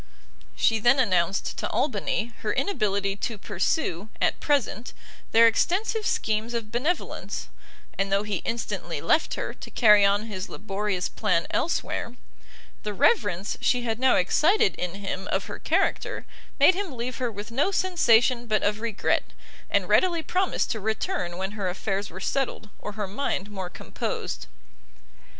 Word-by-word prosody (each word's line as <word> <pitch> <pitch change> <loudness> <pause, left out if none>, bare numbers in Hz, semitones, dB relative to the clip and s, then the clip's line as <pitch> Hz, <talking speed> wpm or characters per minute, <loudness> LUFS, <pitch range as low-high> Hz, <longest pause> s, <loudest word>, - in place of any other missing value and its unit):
She 225 - +3
then 240 +5 +5
announced 195 -6 +1
to - - -2
Albany 230 -2 -1
her 215 - -1
inability 200 - 0
to 220 +2 -3
pursue, 200 - -1
at - - +1
present, 250 -5 0 0.4
their 230 +1 +7
extensive 400 - +2
schemes 220 +2 0
of 220 -2 -3
benevolence; 290 +10 -2 0.5
and 195 0 0
though 200 +1 +3
he 210 -2 -2
instantly 230 +6 -3
left - - +2
her, - - -4
to - - -10
carry 210 -4 +6
on 200 +1 +3
his 205 -3 -5
laborious 195 -2 -2
plan 180 -6 0
elsewhere, 270 -6 -1 0.7
the 210 -1 -4
reverence 205 - +2
she 245 -1 +2
had 225 -1 -2
now 260 0 +4
excited 390 - +3
in 180 0 -4
him 195 -1 -4
of - - 0
her - - -7
character, - - 0 0.3
made - - +7
him 365 -8 -4
leave 240 +1 -3
her 245 -2 -1
with 210 +2 -7
no 280 +10 +2
sensation 250 - +3
but 215 -2 +1
of 210 +1 +1
regret, 230 -3 0 0.4
and - - +1
readily 345 -3 +3
promise 370 +3 0
to 220 - -3
return 220 - -2
when 190 +1 -3
her 205 -3 -2
affairs 195 +2 -2
were 185 - -9
settled, 220 -1 -2
or 210 - -6
her 205 -1 -3
mind 205 -2 -2
more 190 -3 -5
composed. 65 - -5
220 Hz, 155 wpm, -26 LUFS, 200-255 Hz, 0.7 s, their